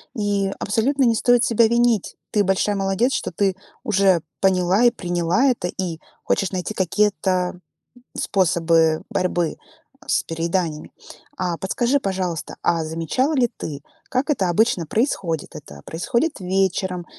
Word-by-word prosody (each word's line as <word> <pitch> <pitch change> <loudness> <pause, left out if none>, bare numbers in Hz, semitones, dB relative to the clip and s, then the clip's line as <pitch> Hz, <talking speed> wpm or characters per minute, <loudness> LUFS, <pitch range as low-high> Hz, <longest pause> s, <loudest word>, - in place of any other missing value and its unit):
И 200 -2 0
абсолютно 260 +7 +1
не 230 -2 +4
стоит 245 +1 +3
себя 230 -1 +4
винить. 235 -3 +1 0.2
Ты 205 -1 +3
большая 195 +2 +1
молодец, 195 +6 +1
что - - -2
ты 195 -2 0 0.3
уже 195 - +3 0.2
поняла 190 +2 +3
и 240 - +6
приняла 175 +3 0
это 245 -9 +1
и 175 -3 -4 0.2
хочешь 195 - 0
найти 185 +3 -3
какие-то 185 -2 0 0.6
способы 165 -3 +2
борьбы 175 -3 -1 0.5
с - - +1
перееданиями. 165 -1 -2 0.5
А, 180 -2 -2
подскажи, 240 +9 0
пожалуйста, 185 - -3
а, 165 -2 +1
замечала 165 - -1
ли 245 -4 +3
ты, 145 -3 -6 0.3
как 260 +4 -1
это 195 -11 +1
обычно 180 -2 +2
происходит? 170 - -1
Это 70 0 -11
происходит 235 - -1
вечером 185 -1 -1
190 Hz, 135 wpm, -22 LUFS, 175-225 Hz, 0.6 s, и